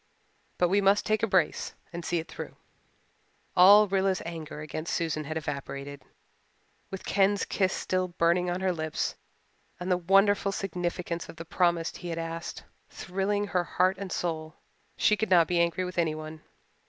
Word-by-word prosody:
But 180 - +3
we 200 +2 +3
must 200 +1 +3
take 215 0 +1
a 225 - +2
brace 185 -5 +1 0.2
and 170 0 -5
see 175 - -1
it 165 - -3
through." - - -8 1.0
All 205 +4 +8
Rilla's 190 -1 +1
anger 160 -3 -6
against 155 +2 -4
Susan 155 -2 -1
had 155 +2 -3
evaporated. 140 -2 -5 0.9
With 190 - -7
Ken's 200 0 +2
kiss 190 -2 +1
still 185 -1 -1
burning 175 +1 +1
on 180 +1 -2
her 190 -1 +1
lips, 155 -2 -2 0.7
and 180 +1 -3
the 180 - +4
wonderful 195 +3 +3
significance 175 -3 -3
of - - -9
the 165 +1 -8
promise 170 -1 +1
he 180 - -8
had 165 - -3
asked 165 +1 -5 0.3
thrilling 195 +2 -2
heart 185 0 +1
and 195 -2 -5
soul, 160 -2 -3 0.4
she 210 - +4
could 220 -1 -2
not 175 -3 +6
be 175 +1 0
angry 170 +2 +1
with 180 -1 -4
anyone. 155 -1 -2
175 Hz, 165 wpm, -28 LUFS, 165-190 Hz, 1.0 s, All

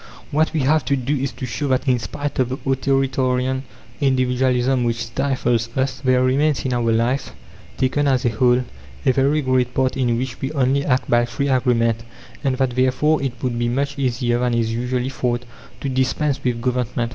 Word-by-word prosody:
What 155 +2 +2
we 155 - 0
have 150 +3 +3
to 140 - +2
do 135 +2 -1
is 135 -1 -2
to 130 - -6
show 135 +4 -3
that, 130 +1 0
in 125 -2 +3
spite 145 +5 -4
of 125 -1 +2
the 130 - -3
authoritarian 130 -1 +1 0.4
individualism 130 -1 +2
which 115 -1 -1
stifles 120 -2 0
us, 130 -1 0
there 130 -1 +2
remains 140 +3 +1
in 130 - 0
our 120 -1 +1
life, 120 +4 0 0.4
taken 145 +3 +1
as 130 -1 +2
a - - +4
whole, 125 +2 +2 0.4
a - - +5
very 140 +4 +2
great 130 -1 +1
part 130 -1 +1
in 120 -3 +1
which 125 0 -4
we 135 - -2
only 140 0 +2
act 130 -2 +1
by 120 0 +3
free 140 +4 -2
agreement; 115 -3 +2 0.4
and 135 -2 0
that 130 -1 +1
therefore 130 +5 +2
it 135 -3 -2
would 120 -2 -1
be 120 0 0
much 140 +3 -2
easier 120 -2 0
than 125 -1 +1
is 115 -1 0
usually 125 +2 -1
thought, 125 -2 -2 0.4
to - - -2
dispense 135 +2 0
with 120 -2 0
Government. 125 -1 -1
130 Hz, 190 wpm, -21 LUFS, 120-135 Hz, 0.4 s, a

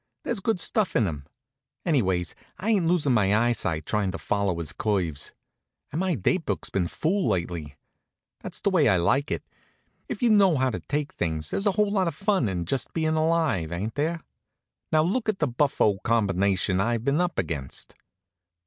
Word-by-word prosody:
There's 235 -3 -1
good 195 0 0
stuff 215 0 +1
in 115 - +4
him. 75 -6 -5 0.6
Anyways, 95 - +1 0.2
I 215 +4 -1
ain't 190 -6 +2
losin' 165 -6 +2
my 105 -2 +3
eyesight, 110 -9 0
tryin' 105 -3 0
to - - -3
follow 100 -4 -1
his 85 -3 -4
curves. 90 -9 -1 0.6
And 155 - -2
my 185 -2 +1
date 160 - +1
book's - - -3
been 90 -3 0
full 185 - 0
lately. 85 -5 -2 0.6
That's - - -7
the 200 - +1
way 165 -7 +4
I 95 - +4
like 135 - +2
it. - - -2 0.7
If - - -4
you 235 - +5
know 195 -7 +5
how 130 0 +2
to - - -3
take 145 0 -3
things 80 -2 -2
there's 200 - 0
a 200 - +3
whole 210 0 +2
lot 190 -3 +2
of 165 - -2
fun 195 - +1
in 90 -2 -2
just 130 +8 -1
bein' 160 -1 +1
alive; 155 - +1
ain't 100 +6 -3
there? 160 +4 -1 0.7
Now 155 0 +4
look 220 +7 0
at 210 - 0
the 150 - +1
buffo 120 -6 +2
combination 100 -4 +1
I've 115 +2 0
been 140 +5 +2
up 180 -1 -1
against. 75 -6 -3
125 Hz, 185 wpm, -26 LUFS, -, 0.7 s, you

